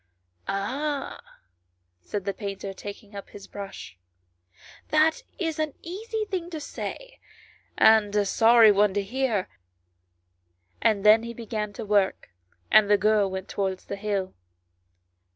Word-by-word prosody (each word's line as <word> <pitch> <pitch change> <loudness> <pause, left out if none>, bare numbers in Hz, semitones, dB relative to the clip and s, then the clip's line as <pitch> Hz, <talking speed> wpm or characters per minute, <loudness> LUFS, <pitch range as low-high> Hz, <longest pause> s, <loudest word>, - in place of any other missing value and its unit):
" 90 - -46
Ah," 275 +9 -3 0.8
said 200 - -5
the 200 - -1
painter, 195 -1 -6
taking 205 +2 -10
up 200 - -8
his 200 -1 -11
brush, 195 - -9 0.4
" 90 +1 -23
that 310 +1 +3 0.2
is 325 -4 -2
an 310 -2 -2
easy 435 +5 -4
thing 370 -4 -4
to 325 -3 -5
say, - - -7 0.6
and 220 -2 +5
a 205 -1 +3
sorry 225 +2 +6
one 205 -1 +3
to 205 - +1
hear 235 -3 -1 0.7
;" 90 0 -45
and 210 -2 +2
then 215 +1 +7
he 235 0 -7
began 215 -2 -4
to 225 +1 -7
work, 200 -2 +1 0.4
and 215 -1 +6
the 205 - +6
girl 210 -1 +3
went 190 0 -5
towards 190 -2 -3
the - - -5
hill. 200 -2 -2
205 Hz, 145 wpm, -26 LUFS, 195-240 Hz, 0.8 s, then